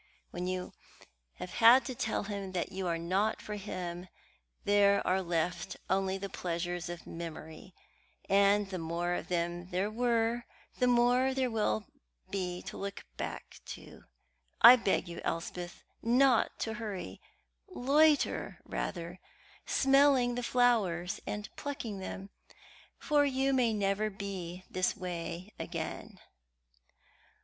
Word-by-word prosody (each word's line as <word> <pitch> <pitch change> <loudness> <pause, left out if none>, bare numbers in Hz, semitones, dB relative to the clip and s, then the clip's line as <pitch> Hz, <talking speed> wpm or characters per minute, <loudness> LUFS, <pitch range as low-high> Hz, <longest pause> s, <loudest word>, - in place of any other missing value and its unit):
When 180 +1 -4
you 185 0 -3 0.6
have 180 - -7
had 240 +3 +7
to 260 - -3
tell 220 -3 -1
him 200 -2 -5
that 175 - -2
you 190 -1 -3
are 170 -1 0
not 190 +6 0
for 210 - -6
him, 180 -3 -5 0.6
there 200 0 +4
are 185 +1 +2
left 175 +1 -2
only 190 0 +1
the 200 +1 -4
pleasures 175 -1 -3
of 175 0 -7
memory, 165 +1 -8 0.5
and 200 +1 +4
the 185 - -3
more 170 +2 -1
of - - -3
them 175 0 -2
there 190 +4 -1
were, 235 0 +1 0.3
the 250 - +4
more 245 +2 +3
there 260 -2 0
will 215 -1 0 0.5
be 180 -2 -3
to 205 +3 -7
look 200 0 -5
back - - -6
to. - - -10 0.5
I 240 +2 +11
beg 200 -5 0
you, 170 0 -7
Elspeth, 175 +1 -4 0.2
not 245 +1 +3
to 225 - -1
hurry; 195 - -5 0.5
loiter 295 +3 +2
rather, 175 0 -4 0.5
smelling 270 -2 +4
the 245 - -2
flowers 220 -9 +2
and 205 0 -3
plucking 245 -8 -5
them, 195 +1 -7 0.7
for 295 -1 +3
you 270 -1 +1
may 250 -3 +3
never 205 0 0
be 185 -3 -6
this 185 0 0
way 180 +2 -5
again." - - -5
195 Hz, 130 wpm, -32 LUFS, 180-235 Hz, 0.7 s, I